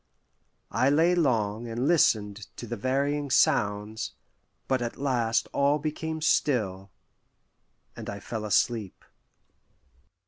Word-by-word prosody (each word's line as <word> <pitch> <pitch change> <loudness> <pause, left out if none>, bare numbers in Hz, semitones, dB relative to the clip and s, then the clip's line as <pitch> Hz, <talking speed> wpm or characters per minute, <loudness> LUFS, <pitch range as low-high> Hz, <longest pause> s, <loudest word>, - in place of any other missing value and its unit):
I 125 +6 +2
lay 165 +5 +4
long 115 -9 0
and 120 +4 -2
listened 105 -10 +2
to - - -7
the 120 - -4
varying 140 +5 -1
sounds, 105 -1 +1 0.5
but 130 -2 +1
at 120 -1 -4
last 120 -5 0
all 140 +1 +3
became 160 +1 -4
still, 100 -11 +1 1.1
and - - -7
I 100 - -5
fell 110 +1 -5
asleep. 105 -1 0
120 Hz, 110 wpm, -27 LUFS, 105-145 Hz, 1.1 s, lay